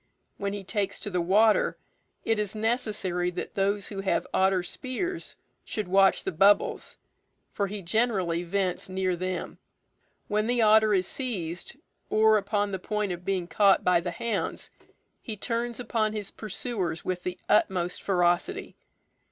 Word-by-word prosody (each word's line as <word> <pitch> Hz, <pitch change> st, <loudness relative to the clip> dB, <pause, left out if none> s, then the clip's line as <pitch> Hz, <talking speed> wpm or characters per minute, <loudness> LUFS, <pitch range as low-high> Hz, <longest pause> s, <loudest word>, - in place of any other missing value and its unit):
When 200 Hz, 0 st, -2 dB
he 205 Hz, -1 st, -5 dB
takes 200 Hz, 0 st, -2 dB
to 205 Hz, -, -4 dB
the 180 Hz, -1 st, 0 dB
water, 210 Hz, +5 st, +3 dB, 0.5 s
it 225 Hz, -1 st, +1 dB
is 210 Hz, 0 st, -1 dB
necessary 215 Hz, -6 st, 0 dB
that 180 Hz, 0 st, -6 dB
those 200 Hz, +1 st, 0 dB
who 195 Hz, -2 st, -4 dB
have 195 Hz, -, 0 dB
otter 190 Hz, -1 st, +3 dB
spears 330 Hz, -, -4 dB, 0.3 s
should 215 Hz, -3 st, -4 dB
watch 195 Hz, +1 st, +4 dB
the -, -, -2 dB
bubbles, 195 Hz, +5 st, +3 dB, 0.6 s
for 200 Hz, -, 0 dB
he 200 Hz, 0 st, -6 dB
generally 190 Hz, -4 st, +1 dB
vents 185 Hz, +1 st, -1 dB
near 185 Hz, -1 st, 0 dB
them. 185 Hz, +1 st, -4 dB, 0.7 s
When 210 Hz, +1 st, 0 dB
the 245 Hz, 0 st, +1 dB
otter 215 Hz, -1 st, +5 dB
is 185 Hz, -1 st, +2 dB
seized, 180 Hz, -9 st, -3 dB, 0.3 s
or 215 Hz, 0 st, +5 dB
upon 205 Hz, 0 st, -1 dB
the 190 Hz, -, -3 dB
point 210 Hz, 0 st, -2 dB
of 175 Hz, 0 st, -5 dB
being 185 Hz, -2 st, -1 dB
caught 200 Hz, +2 st, +4 dB
by 180 Hz, -1 st, +4 dB
the 175 Hz, +1 st, -3 dB
hounds, 230 Hz, +6 st, -3 dB, 0.5 s
he 220 Hz, -4 st, -6 dB
turns 235 Hz, +3 st, -2 dB
upon 220 Hz, -3 st, 0 dB
his 210 Hz, -3 st, -4 dB
pursuers 205 Hz, -5 st, -3 dB
with 180 Hz, -1 st, -2 dB
the 180 Hz, 0 st, -4 dB
utmost 180 Hz, -4 st, +2 dB
ferocity. 180 Hz, -, 0 dB
200 Hz, 150 wpm, -27 LUFS, 180-215 Hz, 0.7 s, otter